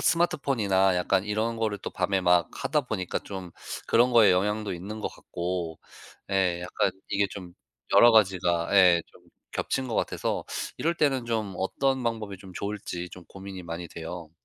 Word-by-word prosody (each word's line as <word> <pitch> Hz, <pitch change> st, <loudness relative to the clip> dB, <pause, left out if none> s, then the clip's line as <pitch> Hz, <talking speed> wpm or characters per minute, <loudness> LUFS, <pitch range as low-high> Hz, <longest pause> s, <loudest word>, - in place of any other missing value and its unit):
스마트폰이나 110 Hz, -, +2 dB
약간 95 Hz, +2 st, +1 dB
이런 110 Hz, +2 st, -1 dB
거를 110 Hz, -2 st, -1 dB
또 -, -, -6 dB
밤에 95 Hz, +1 st, 0 dB
막 90 Hz, -2 st, +4 dB
하다 150 Hz, -1 st, 0 dB
보니까 105 Hz, -8 st, -3 dB
좀 95 Hz, -3 st, -7 dB, 0.4 s
그런 120 Hz, +2 st, +4 dB
거에 115 Hz, -4 st, +7 dB
영향도 105 Hz, +3 st, 0 dB
있는 100 Hz, +5 st, -7 dB
것 -, -, -2 dB
같고. 85 Hz, -2 st, -4 dB, 0.5 s
예, 90 Hz, -3 st, +1 dB
약간 90 Hz, +1 st, 0 dB, 0.2 s
이게 100 Hz, 0 st, +2 dB
좀 90 Hz, -3 st, -8 dB, 0.4 s
여러 120 Hz, 0 st, +8 dB
가지가 90 Hz, -5 st, +3 dB
예 90 Hz, -3 st, +6 dB
좀 -, -, -20 dB, 0.3 s
겹친 130 Hz, -1 st, -2 dB
것 115 Hz, -, -3 dB
같아서 -, -, -1 dB, 0.3 s
이럴 170 Hz, +1 st, +1 dB
때는 135 Hz, -6 st, +1 dB
좀 110 Hz, -5 st, -2 dB
어떤 130 Hz, +7 st, 0 dB
방법이 110 Hz, -4 st, -3 dB
좀 95 Hz, -1 st, -12 dB
좋을지 100 Hz, -4 st, -4 dB
좀 90 Hz, -2 st, -11 dB
고민이 95 Hz, 0 st, -9 dB
많이 85 Hz, +1 st, -6 dB
돼요. 80 Hz, 0 st, -7 dB
95 Hz, 310 characters per minute, -27 LUFS, 90-110 Hz, 0.5 s, 여러